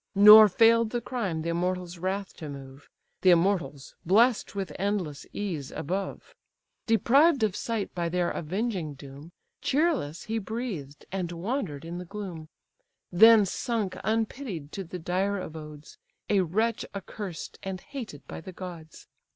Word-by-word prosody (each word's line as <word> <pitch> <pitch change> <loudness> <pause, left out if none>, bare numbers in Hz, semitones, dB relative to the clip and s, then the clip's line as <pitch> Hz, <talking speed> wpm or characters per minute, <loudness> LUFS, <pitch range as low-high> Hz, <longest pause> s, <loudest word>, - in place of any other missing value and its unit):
Nor 210 +2 +10
fail'd 230 +3 +4
the 240 - -1
crime 205 -10 -3
the 170 - -2
immortals' 180 0 -2
wrath 190 +2 -3
to 155 -4 -7
move; 135 0 -11 0.3
(The 185 - +5
immortals 170 -6 +1
bless'd 220 +5 +3
with 195 -1 -3
endless 190 -8 -2
ease 170 -10 -4
above;) 190 +6 -4 0.5
Deprived 265 - +4
of 210 -4 +1
sight 225 -4 -3
by 170 -1 -2
their 175 0 0
avenging 180 -2 -3
doom, 140 +3 -12 0.3
Cheerless 285 - 0
he 225 +1 -2
breathed, 195 - -5
and 180 -3 -3
wander'd 175 - -3
in 170 +1 -5
the 180 - -7
gloom, 180 -5 -7 0.6
Then 220 +3 +7
sunk 220 -1 -2
unpitied 220 - -2
to 195 - -5
the 180 +1 -7
dire 190 +4 -1
abodes, 150 -3 -9 0.3
A 200 -2 +4
wretch 220 +6 0
accursed, 195 -3 -7
and 190 -1 -5
hated 225 - -9
by - - -7
the 185 +3 -10
gods! 170 -4 -9
185 Hz, 145 wpm, -27 LUFS, 165-220 Hz, 0.6 s, Nor